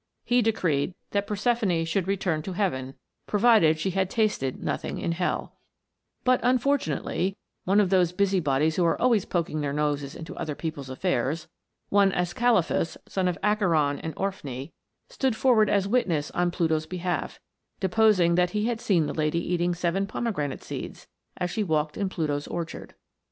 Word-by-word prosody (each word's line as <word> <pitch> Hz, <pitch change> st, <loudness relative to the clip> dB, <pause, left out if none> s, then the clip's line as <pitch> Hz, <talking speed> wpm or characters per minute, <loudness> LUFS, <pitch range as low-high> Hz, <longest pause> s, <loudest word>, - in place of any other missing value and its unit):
He 245 Hz, 0 st, +3 dB
decreed 180 Hz, -8 st, 0 dB, 0.2 s
that 200 Hz, 0 st, 0 dB
Proserpine 210 Hz, -5 st, +1 dB
should 175 Hz, +3 st, -1 dB
return 185 Hz, -5 st, 0 dB
to 185 Hz, +4 st, -5 dB
heaven, 135 Hz, -9 st, -2 dB, 0.3 s
provided 205 Hz, -7 st, +4 dB
she 190 Hz, +5 st, -1 dB
had 190 Hz, 0 st, 0 dB
tasted 210 Hz, -, 0 dB
nothing -, -, -3 dB
in 170 Hz, -, -2 dB
hell; 175 Hz, +2 st, -2 dB, 0.7 s
but, 255 Hz, 0 st, +4 dB
unfortunately, 250 Hz, -7 st, 0 dB, 0.3 s
one 195 Hz, +3 st, +4 dB
of 195 Hz, -3 st, +2 dB
those 180 Hz, -3 st, +4 dB
busybodies 160 Hz, -6 st, +1 dB
who 180 Hz, -, +3 dB
are 165 Hz, -, +2 dB
always 235 Hz, -6 st, +3 dB
poking 160 Hz, -3 st, -1 dB
their 145 Hz, -1 st, -1 dB
noses 145 Hz, -2 st, -1 dB
into 165 Hz, -, -8 dB
other 150 Hz, -2 st, -3 dB
people's 145 Hz, -5 st, -5 dB
affairs, 150 Hz, +1 st, -1 dB, 0.4 s
one 200 Hz, -1 st, +4 dB
Ascalaphus, 180 Hz, -1 st, +1 dB
son 190 Hz, -2 st, 0 dB
of 180 Hz, -, -1 dB
Acheron 170 Hz, -9 st, +2 dB
and 160 Hz, -, -5 dB
Orphne, 150 Hz, -8 st, -4 dB, 0.4 s
stood 265 Hz, -, -1 dB
forward 225 Hz, -4 st, +4 dB
as 200 Hz, -1 st, +2 dB
witness 175 Hz, -10 st, 0 dB
on 175 Hz, 0 st, +1 dB
Pluto's 160 Hz, -2 st, 0 dB
behalf, 180 Hz, -1 st, -3 dB, 0.4 s
deposing 190 Hz, -3 st, +3 dB
that 180 Hz, +3 st, +1 dB
he 210 Hz, -, +1 dB
had 235 Hz, -1 st, -1 dB
seen 175 Hz, -9 st, +2 dB
the -, -, -3 dB
lady 160 Hz, +3 st, -1 dB
eating 175 Hz, 0 st, +1 dB
seven 180 Hz, +3 st, 0 dB
pomegranate 185 Hz, -, -3 dB
seeds, -, -, -7 dB, 0.3 s
as 180 Hz, 0 st, -2 dB
she 215 Hz, -, -1 dB
walked 155 Hz, -4 st, 0 dB
in 200 Hz, -2 st, -1 dB
Pluto's 150 Hz, -5 st, -2 dB
orchard. 170 Hz, -1 st, -6 dB
180 Hz, 160 wpm, -26 LUFS, 160-205 Hz, 0.7 s, provided